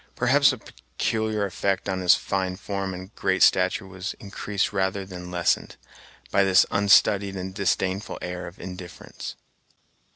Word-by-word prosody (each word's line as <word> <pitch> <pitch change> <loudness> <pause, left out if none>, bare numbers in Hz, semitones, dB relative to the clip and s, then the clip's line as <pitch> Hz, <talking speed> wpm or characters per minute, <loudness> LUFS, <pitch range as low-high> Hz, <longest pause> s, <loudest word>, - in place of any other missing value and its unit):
Perhaps - - +4
the - - -1
peculiar 105 - -3
effect 95 0 -1
of 95 -1 -1
his 90 -1 +6
fine 95 -1 -2
form 100 0 -4
and 95 +4 -10
great 95 -1 +1
stature 95 +2 +3
was 95 0 -6
increased 100 0 -3
rather 95 0 -1
than 90 -2 -8
lessened, 90 -1 0 0.6
by 100 - +4
this 95 -2 +5
unstudied 100 0 +4
and 95 0 -5
disdainful 95 0 -1
air 90 0 -5
of 85 - -12
indifference. 90 -1 -8
95 Hz, 140 wpm, -25 LUFS, 90-100 Hz, 0.6 s, his